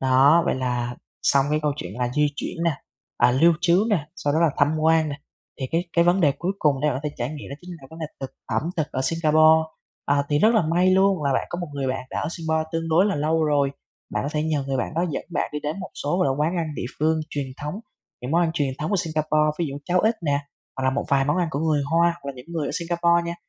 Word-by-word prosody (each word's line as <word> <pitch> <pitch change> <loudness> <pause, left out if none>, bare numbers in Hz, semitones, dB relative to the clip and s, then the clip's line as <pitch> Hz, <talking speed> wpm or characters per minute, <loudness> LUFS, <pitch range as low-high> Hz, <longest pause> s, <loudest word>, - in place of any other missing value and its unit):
Đó, 135 +5 +5
vậy - - +2
là 125 -2 -2 0.3
xong 135 0 +3
cái 150 - +2
câu 150 - +1
chuyện 90 -10 -6
là 125 -1 0
di 150 +1 +3
chuyển 165 +3 -4
nè, 170 - +3 0.5
à, 120 - +5
lưu 160 +7 +5
trú 180 +3 +3
nè, 165 -8 +1
sau 145 -4 -1
đó 155 - +2
là 170 -2 +4
thăm 145 - +4
quan 160 0 +3
nè. 140 - -4 0.4
Thì 130 - -1
cái 170 +2 0
cái 170 - +4
vấn 175 +2 +3
đề 145 -5 +4
cuối 180 +2 -1
cùng 145 -3 +2
để 150 - +2
bạn 130 - -1
có 150 - -1
thể 145 - -12
trải 120 0 -1
nghiệm 150 0 -8
đó - - -4
chính 180 - -11
là 135 - -13
vấn 160 - -11
đề 160 - -3
thực 135 -1 -5 0.2
ẩm - - -1
thực 155 -3 0
ở 130 - -1
Singapore. 160 +1 +4 0.4
À, 140 0 +2
thì 145 - +2
rất 220 +8 +4
là 220 - +4
may 175 +4 +2
luôn 190 -2 +3
là 140 -1 +1
bạn - - 0
có 175 - -4
một 175 - -3
người 140 -1 -2
bạn 130 0 -3
đã - - -2
ở - - -2
Singapore 160 -2 -1
tương 165 0 -2
đối 170 +5 +4
là 205 - 0
lâu 155 +2 +1
rồi. 145 -2 +2 0.4
Bạn - - -1
có 140 - -2
thể 150 -1 0
nhờ 155 -3 -1
người 135 -1 -1
bạn 125 +5 -3
đó 170 +2 +1
dẫn 145 - -3
bạn - - -1
đi 150 - -3
đến 150 +6 -4
một 185 - -7
số, 150 +5 0
gọi 185 - +3
là, 135 - +2
quán 165 +4 +1
ăn 165 -2 -1
địa - - -4
phương 160 +1 +2
truyền 145 -2 -3
thống, 150 +3 -4 0.5
những 125 - -4
món 170 +3 +3
ăn 165 - +1
truyền 140 -5 0
thống 155 - -3
của 205 - +2
Singapore, 155 -3 +1
ví 170 - 0
dụ 140 - -6
cháo 180 +3 +2
ếch 220 +2 +2
nè, 140 -1 +2 0.4
hoặc 130 - -3
là 130 - +3
một 140 +2 -2
vài 135 -1 +3
món 145 +4 +1
ăn 175 -2 +1
của 140 - -2
người 155 -3 +1
Hoa, 170 +1 +4 0.2
hoặc - - -11
là 140 - -3
những 125 - -11
người 165 -4 -3
ở - - -2
Singapore 170 -1 +2
nha, 170 - -3
155 Hz, 290 wpm, -24 LUFS, 140-170 Hz, 0.5 s, Đó